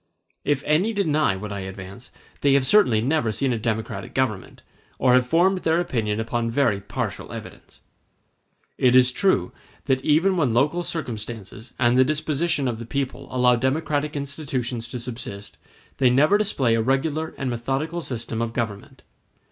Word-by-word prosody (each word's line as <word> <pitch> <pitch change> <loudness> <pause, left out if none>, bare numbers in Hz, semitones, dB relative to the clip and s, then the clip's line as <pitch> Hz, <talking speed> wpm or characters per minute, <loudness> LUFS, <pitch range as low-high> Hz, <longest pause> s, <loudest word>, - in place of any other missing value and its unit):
If 145 -1 0
any 175 +9 +2
deny 155 - +1
what 105 +2 -6
I 100 - -4
advance, 95 +4 -9 0.3
they 140 -1 +3
have 140 -1 +3
certainly 130 - +4
never 135 -2 +1
seen 130 +4 0
a 115 - -2
democratic 110 -2 -3
government, 120 -8 -2 0.3
or 125 -1 +3
have 125 0 +4
formed 180 +6 +3
their 165 -1 +1
opinion 110 -10 -1
upon 115 +1 -1
very 115 -5 +1
partial - - -5
evidence. - - -10 1.0
It 125 -1 +4
is 125 0 +6
true 125 - +1 0.3
that 130 0 +1
even 170 +6 +3
when 135 -9 +1
local 150 +8 +2
circumstances 115 - -5
and 120 0 +3
the - - +8
disposition 150 0 0
of 115 -2 -3
the 115 - -6
people 140 +2 -3
allow 125 -1 +3
democratic 145 +3 -1
institutions 135 -5 -3
to 125 - -4
subsist, 115 -4 -6 0.4
they 130 -2 +4
never 145 +10 +4
display 165 - +2
a 115 - +2
regular 145 +6 -1
and 130 -2 -2
methodical 135 +8 -2
system 115 -5 -4
of 115 0 -2
government. 110 -4 -5
130 Hz, 160 wpm, -23 LUFS, 115-150 Hz, 1.0 s, the